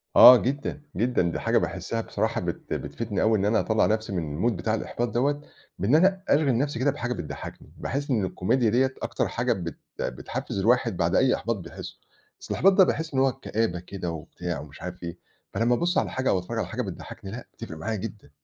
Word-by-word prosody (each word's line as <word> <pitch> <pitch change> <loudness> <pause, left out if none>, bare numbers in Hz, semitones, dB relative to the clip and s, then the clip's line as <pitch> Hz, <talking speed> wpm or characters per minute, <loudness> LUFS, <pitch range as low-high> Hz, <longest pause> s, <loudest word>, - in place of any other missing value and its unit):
آه 125 - +11
جدًا، 140 +4 -2
جدًا، 120 -1 +2
دي - - -3
حاجة - - +2
باحسها 115 0 -1
بصراحة 110 +1 -1
بت 85 -1 -4
بتفيدني 110 -4 -3
أوي 110 0 +4
إن 100 - 0
أنا 110 +1 +3
أطلع 110 -1 +2
نفسي 110 0 0
من 85 +5 0
الMood - - 0
بتاع 105 +5 -1
الإحباط 120 +2 -2
دوّة، 140 +5 +1 0.4
بإن 105 +10 +3
أنا 190 +3 +4
أشغل 140 -5 +4
نفسي 140 -1 -1
كده 140 +3 +3
بحاجة 125 -3 -3
بتضحكني، 80 - -8
باحس 140 +1 -3
إن 110 -6 +2
الكوميديا 110 +6 +1
ديّة 130 +4 +2
أكتر - - -1
حاجة - - 0
بت 85 -5 -5 0.2
بتحفز 65 +9 -3
الواحد 115 -3 +2
بعد 85 0 +1
أي 130 -1 +4
إحباط 115 +1 -1
بيحسه. 85 -3 -9 0.4
أصل - - -4
الإحباط 195 +2 +5
ده 190 - +7
باحس 160 -3 -1
إن 130 - +2
هو 135 0 +4
كآبة 110 -7 -2
كده 90 -1 -5
وبتاع 85 +1 -5
ومش 70 -2 -11
عارف 90 0 -7
إيه. 85 -1 -5 0.4
فلمّا 120 +2 +2
أبُص 175 +7 0
على - - +1
حاجة 130 0 0
أو 95 - +3
أتفرج 90 - -5
على - - -1
حاجة - - -3
بتضحكني 95 - -7
لأ، 120 +2 -7
بتفرق 80 - -8
معايا 110 +8 -2
جدًا. 105 -5 -7
115 Hz, 210 wpm, -26 LUFS, 90-130 Hz, 0.4 s, آه